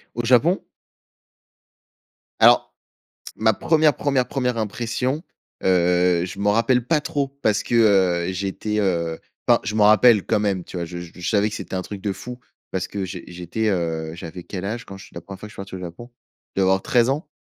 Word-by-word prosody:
Au 120 - -2
Japon? 130 - +3 1.8
Alors, - - +5 0.6
ma 110 0 +3
1re, 155 +5 +3
1re, 135 -3 0
1re, 125 -3 -1
impression, 120 +6 -2 0.4
heu, 90 -1 +3
je 95 - -7
m'en 105 +1 +2
rappelle 120 +2 +2
pas 150 +3 +2
trop 145 -2 -2
parce 105 -1 +2
que, - - -3 0.5
heu, - - -2
j'étais, 100 +3 -3
heu 85 -4 0 0.3
enfin, - - +5
je 105 +2 -3
m'en 105 - +4
rappelle 110 -1 +6
quand 110 - +1
même, 100 -4 -1
tu - - -9
vois? 85 - -2
Je 85 +1 -7
je 85 0 -7
savais 105 -1 +2
que 105 - -5
c'était - - -7
un 95 - -2
truc 100 +1 -8
de 100 0 -2
fou 125 +5 -8 0.3
parce 95 -1 -3
que 100 -2 -4
j'é 90 -1 -7
j'étais, 90 +5 -3
heu, 80 -4 -1
j'avais 85 +1 -8
quel 95 +1 -6
âge 115 +4 -4
quand 95 - -10
je 95 - -12
suis - - -21
la - - -6
1re 100 -1 -10
fois - - -7
que - - -16
je - - -15
suis - - -18
parti 95 -1 -8
au - - -7
Japon? 90 +7 -9 0.5
Je - - +2
devais - - +4
avoir 95 0 +2
13 120 -1 +3
ans. 150 +6 -2
100 Hz, 210 wpm, -22 LUFS, 90-120 Hz, 1.8 s, rappelle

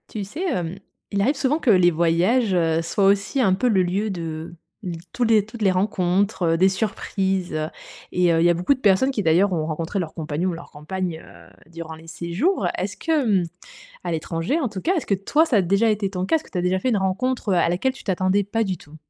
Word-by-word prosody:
Tu 210 - -4
sais, 285 - -7
hem, 190 - -2 0.3
il 200 - 0
arrive 275 +9 +2
souvent 275 +3 +1
que 265 - 0
les 180 -4 +5
voyages, 175 +7 +2
heu, 165 -2 +2
soient 195 +4 0
aussi 200 +6 +2
un 195 -6 +4
peu 225 +7 +1
le 195 -5 +3
lieu 195 +5 -1
de 165 -3 -5 0.6
tous 250 - -1
les 220 -3 +4
toutes 225 +1 -11
les 195 -2 +4
rencontres, 185 +1 0
heu, - - +1
des 185 +3 +5
surprises, 190 -2 -2
heu, 155 0 -1 0.4
et 180 - 0
il 165 0 +3
y 175 - +5
a - - +5
beaucoup 180 +10 +2
de 265 - -8
personnes 215 +4 +3
qui 215 -6 -2
d'ailleurs 180 +4 +3
ont 160 -3 -1
rencontré 165 +5 -3
leur 165 -4 -4
compagnon 160 +3 -2
ou - - -2
leur 170 +1 -10
compagne 160 +2 -5 0.4
durant 165 -1 -8
les 160 +1 -15
séjours. 170 - -1
Heu, - - +2
est-ce - - -3
que 325 - -3
hem, 225 - +2 0.6
à 175 - -2
l'étranger 165 - -1
en 265 - 0
tout 195 -3 -6
cas. 365 - +1
Est-ce 320 - -2
que 200 - +2
toi 245 +12 +2
ça 260 - +1
a 200 - +4
déjà 200 +5 +2
été 210 -2 0
ton 185 -1 -3
cas? 320 - +3
Est-ce 315 - -5
que - - -18
tu 185 - -3
as - - 0
déjà 180 +1 +1
fait 255 +7 0
une 225 - +2
rencontre, 210 +5 -1
heu, - - +3
à 170 - +3
laquelle 180 +10 0
tu 265 - -14
t'attendais 190 +1 +1
pas 225 +3 -1
du 190 -3 -2
tout? 155 -1 -15
190 Hz, 250 wpm, -23 LUFS, 170-220 Hz, 0.6 s, les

